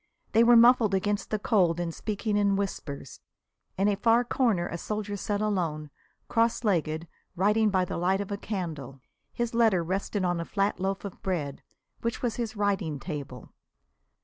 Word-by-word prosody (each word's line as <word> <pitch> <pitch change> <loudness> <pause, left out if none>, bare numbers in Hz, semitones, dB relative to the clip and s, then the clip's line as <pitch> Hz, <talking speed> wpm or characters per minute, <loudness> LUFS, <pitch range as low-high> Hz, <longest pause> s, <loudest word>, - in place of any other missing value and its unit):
They 225 - +5
were 240 +1 +7
muffled 230 -3 +6
against 205 +2 -1
the 215 - 0
cold 180 -6 +2
and 170 -1 -2
speaking 210 +2 -2
in 200 -1 +3
whispers. 160 -9 -5 0.6
In 195 +2 +2
a 205 - +3
far 230 +4 +3
corner 230 -8 +1
a - - -5
soldier 210 +3 -4
sat 205 +1 -2
alone, 165 -8 -1 0.4
cross 230 +1 +1
legged, 165 -5 0 0.3
writing 210 +4 +3
by 185 -2 +2
the - - -4
light 185 +3 +1
of 200 0 -4
a - - 0
candle. 160 - -5 0.3
His 240 -1 -2
letter 220 -7 +3
rested 190 +2 -2
on 175 -1 0
a - - -2
flat 200 +2 -1
loaf 195 +2 -2
of 200 - -8
bread, 155 -8 -3 0.4
which 230 +2 -3
was 240 -2 -1
his 235 -2 -3
writing 195 -8 0
table. 140 -7 -7
200 Hz, 175 wpm, -28 LUFS, 175-215 Hz, 0.6 s, were